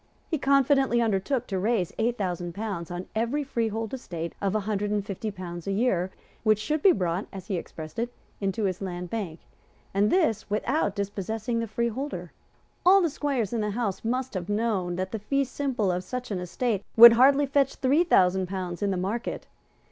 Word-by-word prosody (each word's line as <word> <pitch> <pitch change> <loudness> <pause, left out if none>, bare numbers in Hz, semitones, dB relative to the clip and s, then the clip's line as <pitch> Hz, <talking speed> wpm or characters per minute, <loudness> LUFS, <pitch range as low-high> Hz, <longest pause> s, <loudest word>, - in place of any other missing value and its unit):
He 315 - 0
confidently 270 -2 +3
undertook 230 +3 0
to 195 -5 -2
raise 200 -3 0
eight 235 +2 +1
thousand 175 -3 -3
pounds 200 -6 -4
on 175 +1 -5
every 235 +7 0
freehold 225 -4 -2
estate 170 -10 -5
of 200 0 0
a 215 - +1
hundred 205 0 -1
and 205 -1 -1
fifty 205 +2 -4
pounds 175 -3 -7
a - - 0
year 195 -4 +1 0.3
which 215 -1 +4
should 300 +8 -1
be 390 - +7
brought, 180 - -1
as 190 -2 -8
he 195 - 0
expressed 160 0 -7
it, 240 +1 -1 0.3
into 195 +2 -1
his 185 -1 -1
Land 180 -2 -5
Bank, 190 -8 -4 0.5
and 200 +2 +3
this 230 - +1
without 215 +1 0
dispossessing 210 +4 -2
the 230 - -2
freeholder. 235 +6 -3 0.5
All 380 +2 +7
the 335 - +1
squires 270 -8 -1
in 230 - 0
the 210 - -1
House 205 -2 -2
must 255 +3 -1
have 185 -1 -4
known 205 -5 0
that 185 +1 -3
the 220 - -3
fee 275 +7 0
simple 255 -7 -1
of 180 +1 -2
such 250 +4 -5
an 190 - -1
estate 205 +4 -1
would 235 0 +11
hardly 275 +4 +5
fetch 275 0 +1
three 280 +6 +3
thousand 190 - +3
pounds 180 -1 -4
in 205 - +1
the 190 - 0
market. 200 +6 -3
215 Hz, 195 wpm, -27 LUFS, 190-245 Hz, 0.5 s, would